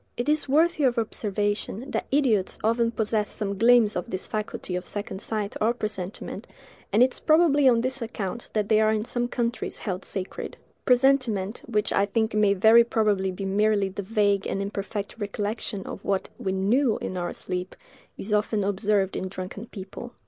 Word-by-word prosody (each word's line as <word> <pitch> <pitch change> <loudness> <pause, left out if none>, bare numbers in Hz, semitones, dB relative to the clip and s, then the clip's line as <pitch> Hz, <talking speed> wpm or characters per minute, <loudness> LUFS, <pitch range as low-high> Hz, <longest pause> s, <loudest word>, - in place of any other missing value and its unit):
It 240 +3 -2
is 300 -2 +2
worthy 315 +2 +3
of 245 -1 +2
observation, 210 +1 -2
that - - -2
idiots 245 -9 +2
often 230 +1 +2
possess 220 -2 -1
some 200 -2 -3
gleams 230 0 +5
of 180 - -3
this 185 - -4
faculty 210 -3 -4
of 180 - -3
second 200 0 -5
sight 215 -3 -3
or 230 +3 +2
presentiment; 210 -4 -5 0.4
and 225 - +5
it 255 0 +2
is - - -4
probably 310 -4 +5
on 235 -2 +3
this 260 +1 -2
account 225 -1 -4
that 210 -2 0
they 215 0 +4
are 215 0 +4
in 215 0 0
some 240 0 -1
countries 240 -1 -2
held 190 -3 -4
sacred. 190 -1 -5 0.3
Presentiment, 245 -6 +2
which 215 -3 0
I 200 - +2
think 220 +2 0
may 210 -1 +3
very 220 +4 +7
probably 210 -4 +1
be 190 +1 -5
merely 200 0 +2
the 195 +2 -5
vague 200 -1 +1
and - - -2
imperfect 200 +1 -4
recollection 205 -1 -3
of - - -7
what 195 -1 -1
we 190 - -2
knew 220 +6 +2
in - - -5
our 175 -1 -2
sleep, 180 0 -5 0.4
is 210 +2 -4
often 210 0 +1
observed 200 0 +1
in 190 - -2
drunken 185 +4 -7
people. 200 +5 -9
210 Hz, 180 wpm, -26 LUFS, 195-235 Hz, 0.4 s, very